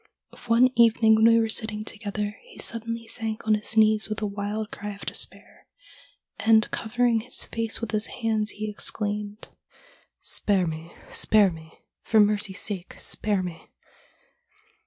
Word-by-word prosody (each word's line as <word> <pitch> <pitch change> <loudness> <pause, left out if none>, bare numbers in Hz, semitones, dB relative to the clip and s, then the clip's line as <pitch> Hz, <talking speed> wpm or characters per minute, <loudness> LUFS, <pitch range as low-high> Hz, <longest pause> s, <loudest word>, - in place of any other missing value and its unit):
One 240 +2 +5
evening 230 -1 +5
when 220 +1 +5
we 230 0 +6
were 225 - +1
sitting 220 -1 -3
together 210 +1 -4
he - - -17
suddenly 230 0 -3
sank 225 -1 -5
on 215 - +3
his 210 +1 -2
knees 215 0 +4
with 215 - -3
a 215 - -2
wild 205 +1 -4
cry 205 0 -6
of 200 - -11
despair, - - -4 0.7
and 220 -1 +4
covering 240 0 +1
his 245 +3 0
face 225 0 -3
with 230 -2 -4
his 215 0 -1
hands 220 -2 -1
he 215 +1 -5
exclaimed: 210 0 -2 0.4
" - - -32 0.2
Spare 195 -3 +2
me, 160 0 -6 0.2
spare 210 -3 +4
me, 160 -1 -13 0.2
for 220 - +2
mercy's 205 -2 +2
sake 190 -4 -3
spare 205 -3 +1
me!" 175 -2 -8
215 Hz, 155 wpm, -25 LUFS, 205-225 Hz, 0.7 s, we